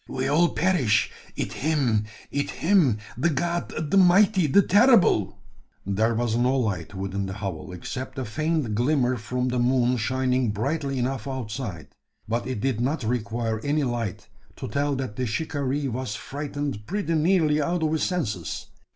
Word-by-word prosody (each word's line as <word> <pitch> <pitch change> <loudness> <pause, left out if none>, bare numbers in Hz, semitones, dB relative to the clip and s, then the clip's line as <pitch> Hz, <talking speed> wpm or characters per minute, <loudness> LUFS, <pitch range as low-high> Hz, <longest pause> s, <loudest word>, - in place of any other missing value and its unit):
"We 130 0 -2
all 165 +5 +4
perish 150 - +2 0.2
it - - -3
him 130 -8 +1 0.3
it 140 0 -1
him 165 - +3 0.2
de 170 - +3
god 165 0 -2
de 195 - +4
mighty 190 -1 +5
de 200 +8 +5
terrible 205 - +4 0.3
" - - -41
There 110 +4 +1
was 115 -1 0
no 125 +3 +2
light 100 -7 -2
within 95 +1 -3
the 95 - -5
hovel, 95 -2 -5
except 130 +9 -6
a 130 - -2
faint 155 0 -1
glimmer 125 +2 +2
from 125 +3 -2
the 125 0 0
moon 125 0 +2
shining 130 +1 +1
brightly 135 +6 -2
enough 130 +2 -2
outside; 115 - -5 0.4
but 120 +2 -1
it 130 -5 -3
did 130 -4 0
not 135 +2 -1
require 115 -1 -1
any 145 +5 0
light 120 -6 -3 0.3
to - - -6
tell 140 +5 0
that 130 -5 -4
the 125 - -1
shikaree 140 +2 -2
was 125 -3 -3
frightened 140 -3 -5
pretty 200 -4 -1
nearly 155 -2 +3
out 170 +2 0
of 155 - +1
his 160 - 0
senses. 110 - -2
130 Hz, 165 wpm, -25 LUFS, 110-155 Hz, 0.4 s, mighty